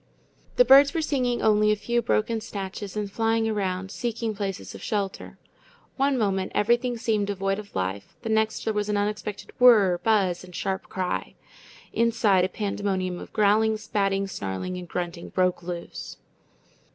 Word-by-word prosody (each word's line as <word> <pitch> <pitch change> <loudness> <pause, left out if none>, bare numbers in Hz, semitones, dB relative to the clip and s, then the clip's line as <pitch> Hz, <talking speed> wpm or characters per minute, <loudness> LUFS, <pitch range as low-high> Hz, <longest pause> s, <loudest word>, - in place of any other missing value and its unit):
The - - +6
birds 280 +2 +7
were 325 - +1
singing 250 -5 0
only 210 -1 +4
a - - +3
few 235 +3 0
broken 225 0 0
snatches, 200 -1 -6
and 205 -1 -3
flying 225 +1 +1
around, 190 -3 -2
seeking 230 -1 -3
places 200 -1 -5
of - - -10
shelter. 200 -3 -3 0.6
One 275 0 +2
moment 195 -4 0
everything 240 +3 +2
seemed 215 -3 0
devoid 195 0 -1
of 205 -1 -11
life, 95 +2 -3
the 225 - -3
next 220 0 +1
there 220 - 0
was 210 0 -1
an 210 - +1
unexpected 210 0 -3
whir, 210 -8 +6
buzz, 190 -4 +1
and 180 -1 -12
sharp 190 +2 -3
cry. 185 -1 -3 0.6
Inside, 220 -5 +3
a - - -3
pandemonium 195 -3 -2
of - - -10
growling, 215 +1 +3
spatting, 195 -2 0
snarling, 100 - -4
and 180 -1 -7
grunting 175 -1 -4
broke 180 -1 +1
loose. 175 0 -7
205 Hz, 160 wpm, -25 LUFS, 190-225 Hz, 0.6 s, birds